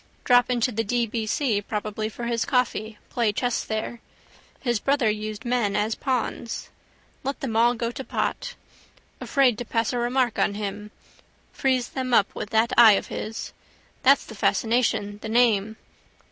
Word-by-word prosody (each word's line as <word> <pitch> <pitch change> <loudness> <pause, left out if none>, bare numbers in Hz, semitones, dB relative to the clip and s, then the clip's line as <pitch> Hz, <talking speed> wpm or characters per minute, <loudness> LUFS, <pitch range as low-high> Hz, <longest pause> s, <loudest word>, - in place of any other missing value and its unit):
Drop 245 0 +4
into 250 0 +1
the 225 0 -1
D.B.C. 230 0 0
probably 215 +1 -3
for 235 - -8
his 235 -1 0
coffee, 225 -4 -1
play 235 -3 +1
chess 245 +3 -1
there. 220 +2 -4 0.6
His 240 -4 0
brother 275 -3 +2
used 215 +1 -5
men 235 -5 0
as 210 +2 +1
pawns. 250 -3 -3 0.5
Let 275 +1 -3
them 235 -5 -3
all 235 +2 +4
go 235 0 -2
to 265 - -6
pot. - - -3 0.6
Afraid 260 -6 +2
to - - -2
pass 225 0 -1
a 245 - -1
remark 245 0 0
on 200 - +1
him. 205 0 -5 0.6
Freeze 260 -2 0
them 255 -2 -1
up 200 - +3
with 210 - -5
that 220 +1 +2
eye 225 -3 +9
of - - -1
his. 220 +1 -5 0.5
That's 275 +1 +5
the - - -10
fascination: 210 -1 0
the 220 - -5
name. 220 -3 +3
230 Hz, 160 wpm, -25 LUFS, 215-245 Hz, 0.6 s, eye